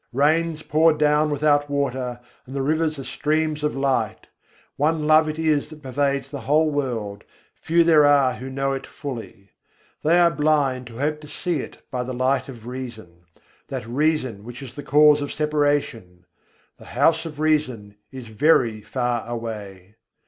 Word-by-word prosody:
Rains 155 +3 +1
pour 160 +2 +4
down 150 0 +2
without 145 0 +2
water, 130 -3 -2 0.3
and 130 - -9
the 135 - -1
rivers 155 +1 0
are 135 - -6
streams 155 +2 -1
of 150 - 0
light. 135 -6 -1 0.5
One 155 +1 0
Love 155 0 +5
it 155 - -4
is 155 -3 +1
that 155 -1 -13
pervades 140 +1 -1
the 140 - -5
whole 155 +5 +2
world, 115 -8 -3 0.3
few 170 +1 +2
there 160 -3 +5
are 140 -3 +4
who 130 +1 -7
know 135 +1 -1
it 135 0 -5
fully: 115 -8 -8 0.5
They 165 +3 +4
are 170 -1 +5
blind 140 -5 +1
who 115 - -11
hope 150 +3 -1
to 150 - -11
see 165 +2 -3
it - - -9
by 125 - -2
the 125 +1 -4
light 130 +1 0
of 115 -4 -11
reason, 115 -9 -8 0.4
that 130 -5 -5
reason 130 -4 -1
which 120 +4 -9
is 125 -3 -10
the 145 - -7
cause 150 +1 +5
of 145 - -4
separation 145 - -1 0.5
The - - -14
House 165 0 +3
of 150 -2 -10
Reason 140 -10 0 0.2
is 130 -2 -8
very 110 -1 +2
far 120 0 -2
away! 105 -4 -7
140 Hz, 170 wpm, -23 LUFS, 125-150 Hz, 0.5 s, Love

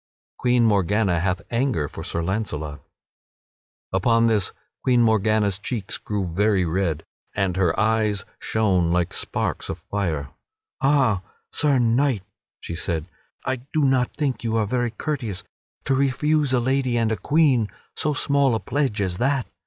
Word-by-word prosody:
[Sidenote: - - -89
Queen 125 -1 +3
Morgana 100 -3 +2
hath 90 +2 0
anger 120 - 0
for - - -8
Sir 85 - -2
Launcelot] 80 -7 -3 1.1
Upon 115 +5 +3
this 110 -4 +2 0.3
Queen 125 -2 +4
Morgana's 110 -2 +2
cheeks 105 -2 -3
grew 105 -2 -2
very 95 +2 +2
red, 80 -2 -1 0.3
and 95 -3 0
her 90 -3 +1
eyes 110 -3 +1
shone 95 -6 +2
like 90 -1 +1
sparks - - -3
of - - -3
fire. 80 -9 -1 0.5
"Ha, 135 -8 +3 0.3
Sir 145 -3 +3
Knight," 120 -2 +2 0.4
she - - -6
said, 80 0 -2 0.4
"I 130 - 0
do 140 +5 -2
not 130 -2 +2
think 140 -5 -1
you 115 -1 -1
are 110 - +2
very 120 +3 0
courteous 115 - -4 0.4
to 135 - +2
refuse 140 +2 +2
a 130 - +3
lady 130 0 +1
and 115 -1 +1
a - - +2
queen 130 - +2 0.3
so 155 -1 0
small 140 -3 +2
a - - 0
pledge 130 -7 -1
as 90 -2 -2
that. 135 0 +1
110 Hz, 155 wpm, -23 LUFS, 95-130 Hz, 1.1 s, Queen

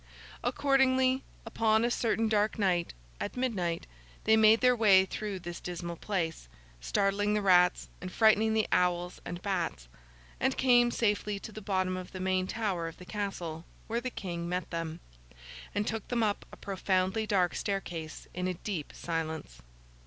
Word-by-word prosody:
Accordingly, 260 -1 +3 0.2
upon 225 0 +2
a 240 - +1
certain 225 -1 +1
dark 215 0 +1
night, 180 - +1 0.2
at - - -4
midnight, 190 -10 -1 0.4
they 220 - +5
made 220 +1 +6
their 250 0 +5
way 200 -5 +6
through 205 +1 -4
this 175 -1 -7
dismal 175 -1 -5
place: 165 - -3 0.3
startling 200 - +1
the 210 - +1
rats, 180 -2 +4
and 185 - -6
frightening 220 +1 +4
the 220 - +2
owls 180 0 +1
and 175 +1 -6
bats: 185 - -2 0.5
and 265 +1 +1
came 245 -2 +5
safely 210 -3 0
to 215 - -8
the 215 - -8
bottom 185 -2 0
of 185 -1 -8
the 185 - -6
main 185 0 0
tower 195 -7 -2
of 165 - -8
the 180 - -11
Castle, 180 -5 -4 0.2
where 230 +1 -2
the 255 - -3
King 175 -6 -5
met 180 0 -3
them, 165 0 -4 0.7
and 205 - +1
took 220 -1 -3
them 235 -2 0
up 205 -2 -1
a - - -11
profoundly 190 +2 0
dark 185 -4 +2
staircase 175 -5 -4
in 180 0 -2
a 185 - -2
deep 170 -4 -5
silence. 160 - -4
195 Hz, 165 wpm, -30 LUFS, 175-220 Hz, 0.7 s, made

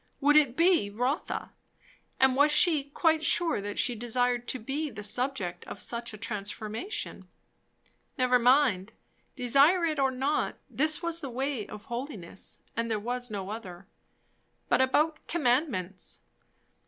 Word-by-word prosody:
would 295 +1 +4
it 280 -5 +4
be 335 - +4
Rotha? 250 - -2 0.7
and 265 -1 +5
was 290 +2 +5
she 300 -2 +5
quite 315 +2 +1
sure 330 -8 +2
that 205 0 -5
she 245 - +3
desired 245 +1 -1
to - - -1
be 275 +6 -3
the 210 -4 -8
subject 210 -6 -2
of - - -8
such 235 0 -4
a 215 - -9
transformation? 210 - -4 0.9
Never 250 -1 +3
mind; 245 -5 +3 0.4
desire 280 +8 +4
it 310 -3 -1
or 270 -1 +3
not, 265 +3 -1
this 310 +3 +1
was 335 0 0
the 280 -5 -6
"way 260 -2 -3
of 210 - -10
holiness," 235 - -6
and 230 0 -1
there 220 - 0
was 245 +3 -3
no 200 -2 -5
other. 190 -5 -8 0.8
But - - +4
about 305 +4 +2
commandments? 245 - -1
250 Hz, 140 wpm, -28 LUFS, 215-295 Hz, 0.9 s, and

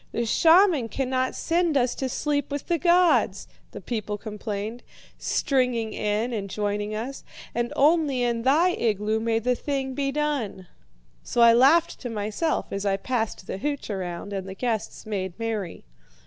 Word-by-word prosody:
"'The 235 - -1
shaman 325 - +4
cannot 260 +2 -1
send 335 -3 +1
us 245 -1 +2
to 265 - -3
sleep 290 +2 -1
with 285 -1 -4
the 340 -1 0
gods,' 350 0 +3 0.2
the - - -9
people 215 -3 -4
complained, 210 +2 -5 0.4
stringing 250 -5 0
in 215 +4 -1
and 200 -3 -3
joining 205 +1 -2
us, 245 +6 -5 0.3
'and 240 0 -1
only 290 -3 +3
in 235 -1 0
thy 295 +9 +4
igloo 215 - 0
may 225 0 0
the 245 +3 +1
thing 270 0 -3
be 275 +1 -1
done.' 275 -10 -2 0.6
"So 240 - -1
I 235 0 +8
laughed 290 +8 +4
to 245 - -5
myself 220 +9 -1
as 195 0 -2
I 195 -1 +1
passed 225 -3 -2
the 190 - -5
hooch 285 -2 -3
around 185 0 -5
and 195 -1 -4
the 190 - -7
guests 225 -1 -3
made 190 -4 -4
merry. 220 - -4
235 Hz, 160 wpm, -25 LUFS, 210-280 Hz, 0.6 s, I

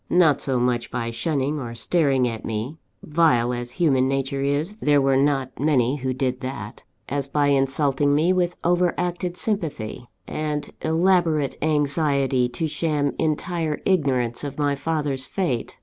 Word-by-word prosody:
Not 165 -6 +4
so 130 -2 0
much 120 -1 0
by 115 -1 -3
shunning 145 +3 -1
or 120 -3 -6
staring 135 0 +2
at 115 -2 -5
me 115 +8 -4 0.2
(vile 135 -7 +2
as 120 0 -5
human 135 -7 +2
nature 135 0 -1
is, 145 +9 -1
there 150 -9 +3
were 135 -1 +3
not 135 -2 +1
many 135 -2 +2
who 130 -1 -2
did 130 -1 -2
that), 130 +2 -6 0.3
as 140 0 -2
by 145 +1 +1
insulting 140 +1 +2
me 165 +5 +3
with 175 -1 0
over 175 0 +2
acted 180 0 -2
sympathy, 150 - -3 0.2
and 150 -1 -3
elaborate 160 -3 +2
anxiety 140 -4 +1
to 160 +6 -2
sham 150 -2 -1
entire 160 0 -1
ignorance 130 -10 +1
of 140 -1 -5
my 145 -1 +1
father's 145 -3 -2
fate. 135 - -2
145 Hz, 150 wpm, -23 LUFS, 130-160 Hz, 0.3 s, Not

